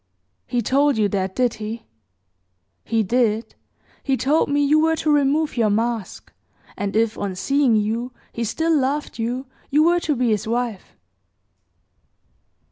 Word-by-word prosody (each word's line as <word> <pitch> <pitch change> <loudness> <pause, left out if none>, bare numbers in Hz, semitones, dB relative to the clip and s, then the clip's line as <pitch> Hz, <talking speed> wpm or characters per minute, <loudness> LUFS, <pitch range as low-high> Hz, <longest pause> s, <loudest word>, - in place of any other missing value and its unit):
"He 240 -1 -1
told 280 +2 +2
you 210 -1 +3
that, 190 -1 -2
did 250 -2 +1
he?" 220 +2 -5 1.0
"He 225 -1 0
did. 225 0 0 0.5
He 270 -1 0
told 290 +5 +1
me 285 0 +2
you 300 +2 +4
were 320 +1 +3
to 310 -1 0
remove 290 0 +2
your 225 -2 +3
mask; 225 0 -2 0.4
and 200 0 -3
if, 225 0 +1
on 195 -2 -3
seeing 270 +4 +2
you, 225 +4 -1 0.2
he 235 - -3
still 320 +9 0
loved 280 -2 -1
you, 245 +4 -2 0.2
you 300 +2 +4
were 345 +2 +4
to 310 -4 -1
be 245 -1 +1
his 215 -1 0
wife." 235 -3 -3
245 Hz, 150 wpm, -22 LUFS, 220-285 Hz, 1.0 s, you